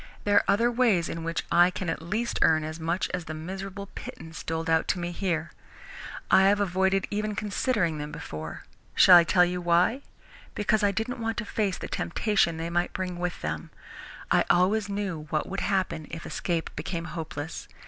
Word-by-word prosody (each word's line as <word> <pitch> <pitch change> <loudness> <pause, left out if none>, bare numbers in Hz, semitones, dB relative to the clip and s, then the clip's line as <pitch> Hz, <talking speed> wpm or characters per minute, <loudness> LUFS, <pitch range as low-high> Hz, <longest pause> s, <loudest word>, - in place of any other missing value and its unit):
"There 205 0 +3
are - - +5
other 230 +5 +3
ways 230 -9 +2
in 165 - -5
which 165 0 -2
I 175 +1 +6
can 185 0 -5
at 165 - -2
least 215 +8 -2
earn 155 -1 +4
as 155 +1 -5
much 170 +3 -1
as 180 -2 -3
the 155 - -5
miserable 190 +4 -6
pittance 160 0 -8
doled 160 +1 -3
out 160 0 +2
to - - 0
me 175 0 -3
here. 170 -3 -2 0.8
I 190 - +7
have 205 0 +3
avoided 190 0 +1
even 210 0 -2
considering 200 - 0
them 150 0 -5
before. 80 +1 -7 0.3
Shall 185 - +9
I 175 - +9
tell 180 +2 +4
you 180 0 -3
why? 175 +9 +2 0.5
Because 215 +1 +1
I 205 - +4
didn't 220 +5 -3
want 225 0 -2
to 235 - -2
face 200 -3 -1
the - - -6
temptation 180 -3 0
they 165 +1 -4
might 175 +1 0
bring 180 -2 -4
with 180 0 -3
them. 80 0 -3 0.6
I - - +5
always 200 +4 +3
knew 190 -6 -3
what 155 +1 -1
would 195 +1 -3
happen 185 -5 -1
if 165 0 -7
escape 170 -2 -2
became 165 +2 -4
hopeless. 160 -3 -6
180 Hz, 190 wpm, -27 LUFS, 165-200 Hz, 0.8 s, Shall